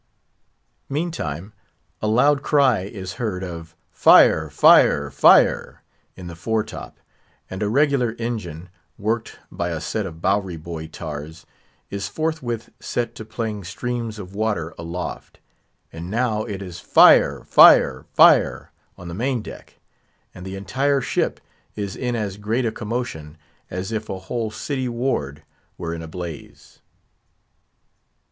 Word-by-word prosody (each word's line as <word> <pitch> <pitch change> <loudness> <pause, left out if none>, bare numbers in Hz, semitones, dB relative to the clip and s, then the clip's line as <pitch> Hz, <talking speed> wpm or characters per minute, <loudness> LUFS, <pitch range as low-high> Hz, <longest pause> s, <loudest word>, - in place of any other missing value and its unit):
Meantime, 110 - -4 0.5
a 105 - -1
loud 135 +6 +3
cry 140 -8 +3
is 95 -1 -7
heard 95 -5 -2
of 85 -2 -8 0.2
"Fire! 80 -1 +6
fire! 70 - +5
fire!" - - +4 0.3
in 90 - -10
the 85 -1 -8
fore 110 +5 -1
top; - - -10 0.5
and 95 +2 -5
a 105 - 0
regular 135 -2 +2
engine, 90 -8 -5 0.3
worked 110 +2 -2
by 85 - -3
a 80 -2 -3
set 95 +6 -3
of 80 -2 -10
Bowery 95 -1 0
boy 80 0 -7
tars, 80 0 -8 0.5
is 100 0 -3
forthwith 145 -8 -3
set 120 -1 -3
to 110 - -8
playing 110 -2 -5
streams 115 +4 -4
of 95 -2 -9
water 100 -7 -2
aloft. 85 +2 -7 0.5
And 85 +2 -7
now 110 -1 0
it 100 -3 -5
is 90 -2 -8
"Fire! - - +5
fire! 65 -1 +6
fire!" - - +4 0.3
on 90 - -10
the 85 - -6
main 120 +3 -1
deck; - - -12 0.6
and 90 - -11
the 95 - -6
entire 135 +9 0
ship - - -1 0.4
is 100 -2 -4
in 125 -1 -2
as 105 -4 -3
great 110 +5 -1
a 115 - 0
commotion 105 -11 -5 0.3
as 90 +3 -5
if 110 -1 -4
a 95 - -3
whole 110 +4 -4
city 130 +3 -3
ward 100 - -2 0.3
were 85 -1 -4
in 85 - -6
a 80 - -8
blaze. 85 -2 -9
105 Hz, 140 wpm, -22 LUFS, 85-120 Hz, 0.6 s, Fire